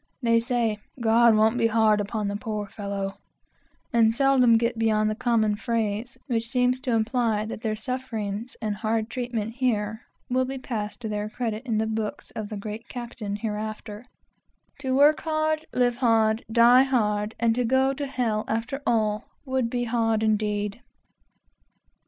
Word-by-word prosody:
They 230 -1 +4
say, 230 -3 0 0.2
"God 230 0 +5
won't 220 +3 +3
be 230 - +4
hard 220 -2 +3
upon 210 0 -3
the 200 - -2
poor 210 -1 -3
fellow," 200 -1 -5 0.7
and 225 -1 +5
seldom 255 -3 +5
get 230 0 -1
beyond 215 -1 +2
the - - -3
common 220 -3 +1
phrase 225 0 -2
which 230 -4 -1
seems 250 0 +2
to 255 -4 0
imply 225 -1 +1
that 220 0 -6
their 220 -2 -1
sufferings 225 -2 -4
and 210 -1 -1
hard 220 +1 -1
treatment 235 -3 -3
here 220 -3 0 0.3
will 255 +1 0
excuse 235 -6 -4
them 210 -2 -3 2.1
hereafter, 215 0 -5 0.8
"To 260 -2 -1
work 295 +3 +5
hard, 310 0 0
live 245 -1 +1
hard, 225 -2 +2
die 240 +2 +7
hard, 215 -5 0
and 235 +1 +1
go 265 +1 +3
to 280 +1 -4
hell 230 -5 -1
after 230 +5 -2
all, 215 -2 +1 0.2
would 260 -3 0
be 245 0 -1
hard 225 -2 +1
indeed!" 210 0 0
225 Hz, 135 wpm, -25 LUFS, 215-250 Hz, 2.1 s, die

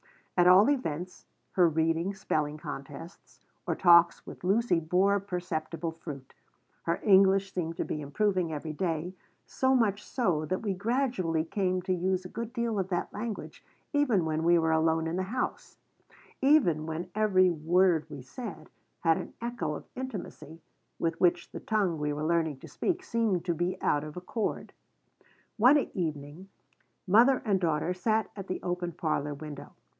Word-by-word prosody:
At 175 -1 +4
all 185 +4 +7
events, 180 - -4 0.2
her 180 -3 +4
readings, 165 +4 0
spelling 150 -4 -1
contests, 150 +2 -9 0.3
or - - 0
talks 170 -1 +5
with - - -11
Lucy 195 -1 +2
bore 185 +5 +2
perceptible 170 -3 -4
fruit. 150 -5 -9 0.5
Her 170 0 -1
English 195 -1 +4
seemed 165 -2 -3
to - - -1
be 150 - -4
improving 180 +3 0
every 155 +1 -4
day, 170 +1 -2 0.3
so 265 0 +1
much 210 -4 +1
so 180 - 0
that 185 +6 -3
we 205 -3 0
gradually 200 -6 0
came 185 0 -1
to 185 - 0
use 185 +1 -1
a - - -7
good 230 +3 -5
deal 235 -4 -1
of 190 -1 -2
that 175 -2 -2
language 215 0 -6 0.3
even 250 - +2
when 160 0 -1
we 170 +1 +5
were 160 -1 +2
alone 160 0 +2
in 165 +2 -2
the - - 0
house; 245 +7 -4 0.6
even 230 - +3
when 170 +3 -5
every 190 -4 +3
word 170 +1 +2
we 140 -3 -8
said 185 - -8 0.3
had 165 -1 +3
an - - -8
echo 235 -11 -3
of - - -9
intimacy 190 - -7 0.4
with 165 0 -2
which 175 -1 +2
the - - -6
tongue 195 -7 0
we 150 0 -1
were 150 +1 -3
learning 160 -3 +1
to - - -12
speak 365 0 -2
seemed 225 - 0
to 175 - +1
be 175 +3 -2
out 145 0 +2
of 150 +2 -8
accord 205 +5 -3 0.8
One 250 +7 +6 0.2
evening 155 +1 -4 0.6
mother 235 +7 +5
and 200 -3 +2
daughter 165 +1 0
sat 215 +4 0
at 195 -2 -7
the 185 - -4
open 175 -1 -3
parlor 150 -4 -2
window. 145 -1 -9
180 Hz, 165 wpm, -29 LUFS, 160-200 Hz, 0.8 s, all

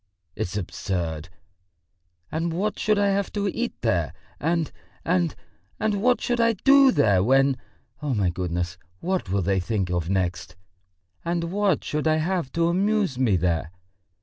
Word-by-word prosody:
It's 90 - -3
absurd! 85 -4 -3 1.0
And 165 +2 -1
what 200 +6 -1
should 215 -1 +2
I 200 0 +3
have 200 0 0
to 205 -1 -1
eat 240 +5 -3
there? - - 0 0.3
And... 165 -1 0 0.3
and... 175 -2 +1 0.4
and 210 -2 0
what 250 +2 +3
should 245 -1 0
I 230 0 +4
do 275 +5 +6
there 100 - +3
when.... 135 +3 +4 0.5
Oh, 145 -4 -1
my 95 -4 +1
goodness, 90 0 -3 0.2
what 185 - -2
will 95 0 +1
they 95 +1 +1
think 95 -1 -1
of 90 -1 -1
next?... 90 -2 -1 0.7
And 170 0 -1
what 200 -4 +1
should 150 +1 -1
I 155 - +4
have 165 -3 -1
to 165 0 +2
amuse 195 -5 +1
me 120 -7 +3
there?... 85 -2 0
155 Hz, 155 wpm, -25 LUFS, -, 1.0 s, do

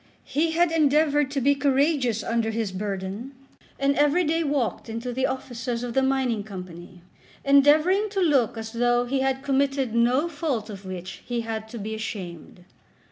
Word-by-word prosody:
He 320 +2 0
had 345 0 +3
endeavoured 295 -2 +3
to 280 0 -1
be 280 +2 +4
courageous 275 -4 +1
under 230 -1 0
his 220 -2 -2
burden, 200 +5 -5 0.4
and 275 0 +1
every 295 +5 +3
day 330 +1 +1
walked 280 -6 -1
into 230 +2 -4
the 260 +2 +1
offices 245 -2 -4
of 240 -1 -4
the 265 - +3
Mining 265 -5 0
Company, 180 -3 -10 0.4
endeavouring 305 +9 +4
to 395 -1 -2
look 280 - +2
as 225 0 -6
though 240 +1 +2
he 265 +2 -1
had 265 0 0
committed 275 -3 0
no 245 +7 +3
fault 290 -9 -3
of 195 -1 -10
which 185 0 -7
he 240 -1 -1
had 220 -1 -5
to 235 - -7
be 215 +1 -5
ashamed. 180 -5 -7
255 Hz, 170 wpm, -25 LUFS, 220-285 Hz, 0.4 s, be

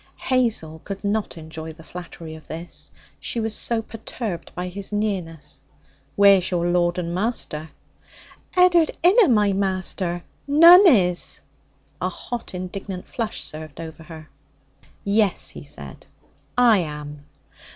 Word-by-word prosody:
Hazel 225 -12 0
could 195 0 -6
not 205 -2 -1
enjoy 160 0 -8
the 165 +1 -15
flattery 170 -2 -9
of 160 0 -12
this; 165 +2 -6 0.3
she 235 - -2
was 220 -1 -1
so 230 -1 0
perturbed 220 -4 -6
by 180 +1 -3
his 195 +3 -6
nearness. 190 -7 -3 0.5
'Where's 195 -2 +6
your 175 -2 0
lord 175 0 +2
and 170 -1 -2
master?' 175 -6 -3 0.9
'Ed'ard 350 -3 +5
inna 395 +4 +6
my 210 -4 +3
master. 185 -2 -1 0.2
None 340 +7 +9
is.' 180 - +3 0.6
A - - 0
hot 240 -5 -6
indignant 185 0 -6
flush 225 -3 -3
surged 155 -1 -9
over 160 0 -8
her. 160 -1 -11 0.8
'Yes,' 200 -1 +1
said - - -8
he; - - -36 0.3
'I 240 -3 +6
am.' 150 -3 -6
185 Hz, 130 wpm, -23 LUFS, 165-220 Hz, 0.9 s, None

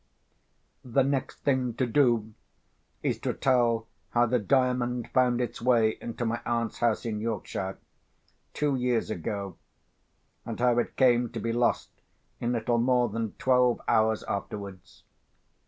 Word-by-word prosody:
The 130 +2 +2
next 135 0 -2
thing 130 -4 +1
to 130 - +1
do 120 -4 +2 0.7
is - - 0
to - - -2
tell 120 -3 +2 0.2
how 120 0 +3
the 125 +1 +1
Diamond 125 +1 0
found 125 -2 +3
its 120 -2 -3
way 115 -3 +3
into 120 +1 -4
my 115 +1 -1
aunt's 115 -1 -2
house 120 -1 +1
in 110 -2 -2
Yorkshire, 100 -3 -3 0.8
two 145 -2 +1
years 125 -3 0
ago, 100 0 -4 0.9
and 115 -1 -6
how 120 -1 +3
it 120 - -2
came 120 -2 +4
to 115 - -3
be 115 0 -2
lost 120 0 +1 0.5
in 120 - -1
little 120 0 0
more 125 0 +2
than 110 0 -3
twelve 125 -2 +2
hours 110 0 +2
afterwards. 100 -2 -6
120 Hz, 140 wpm, -28 LUFS, 110-125 Hz, 0.9 s, came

